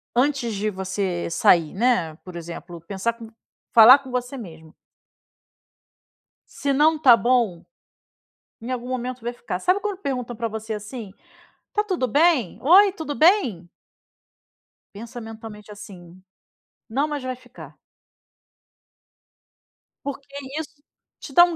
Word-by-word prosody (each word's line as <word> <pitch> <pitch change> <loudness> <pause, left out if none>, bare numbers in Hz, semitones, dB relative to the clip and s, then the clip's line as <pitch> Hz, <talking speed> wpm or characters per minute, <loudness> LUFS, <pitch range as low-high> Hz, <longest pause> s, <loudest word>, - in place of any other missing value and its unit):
antes 250 -3 +1
de 210 +2 -1
você 190 -2 -3
sair, 165 -1 +3
né, 195 -8 +1
por 180 -2 -11
exemplo, 170 0 -8
pensar 190 +7 -2
com 230 -1 -11 0.5
falar 235 +4 +9
com 270 -1 -12
você 250 +2 -3
mesmo 160 -7 -11 1.8
se 280 -1 -2
não 305 +4 +4
está 265 -6 +7
bom, 235 -6 +1 1.0
em 235 +3 -6
algum 250 -1 -4
momento 255 0 -4
vai 240 +1 -3
ficar. 180 -6 -5
Sabe 370 - +1
quando 410 -3 -3
perguntam 250 - -4
para 230 +1 -2
você 220 0 -5
assim: 210 0 -7 0.6
"Tá 420 - +2
tudo 370 -11 -1
bem?", 290 - +2
"Oi, 380 +7 +6
tudo 315 -5 -5
bem?" 300 - +3 1.3
pensa 230 +3 -8
mentalmente 220 -1 -10
assim: 185 -3 -12 0.7
"Não, 275 +6 0
mas 295 -2 -4
vai 255 0 -3
ficar". 255 - -14 2.3
Porque 280 -1 -6 0.3
isso 295 -2 -9 0.4
te 275 - -10
dá 345 - +9
um 345 -1 +1
240 Hz, 130 wpm, -23 LUFS, 200-280 Hz, 2.3 s, falar